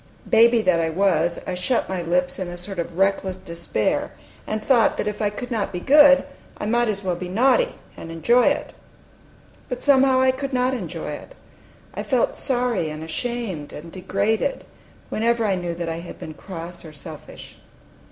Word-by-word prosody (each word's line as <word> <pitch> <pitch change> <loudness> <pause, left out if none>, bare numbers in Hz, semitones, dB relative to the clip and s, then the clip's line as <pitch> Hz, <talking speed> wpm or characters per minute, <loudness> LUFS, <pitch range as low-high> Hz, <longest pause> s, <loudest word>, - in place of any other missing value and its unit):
Baby 230 0 +5
that 180 -4 +3
I 165 -1 +1
was, 170 -1 +1
I - - -3
shut 185 +7 0
my 185 -1 -2
lips 180 +2 0
in 185 - -3
a 175 0 -7
sort 180 +1 -5
of 170 0 -4
reckless 195 -1 +1
despair, 170 - -2 0.4
and 215 - -1
thought 245 -4 +4
that - - -1
if 210 0 -3
I 210 - +2
could 245 +4 -7
not 220 -4 -1
be 180 - -4
good, 280 +4 +7 0.3
I - - -4
might 240 +2 +2
as 205 -2 -2
well 180 -2 0
be 180 +1 -6
naughty, 270 - +3 0.2
and 165 - -8
enjoy 235 +10 +3
it. - - 0 1.0
But 250 - -4
somehow 265 -2 +5
I 260 0 +5
could 270 +1 -5
not 255 +1 +2
enjoy 255 - -4
it. - - -9 0.6
I - - -4
felt 255 -4 +1
sorry 245 - 0
and 155 +1 -6
ashamed 190 - -4
and 165 +3 -9
degraded 200 - -1 0.5
whenever 230 +1 +1
I 200 - +2
knew 175 -2 -3
that 170 0 -4
I 165 0 -3
had 170 - -9
been 155 - -8
cross 170 0 -8
or 160 -2 -11
selfish. 145 - -10
195 Hz, 185 wpm, -23 LUFS, 175-245 Hz, 1.0 s, good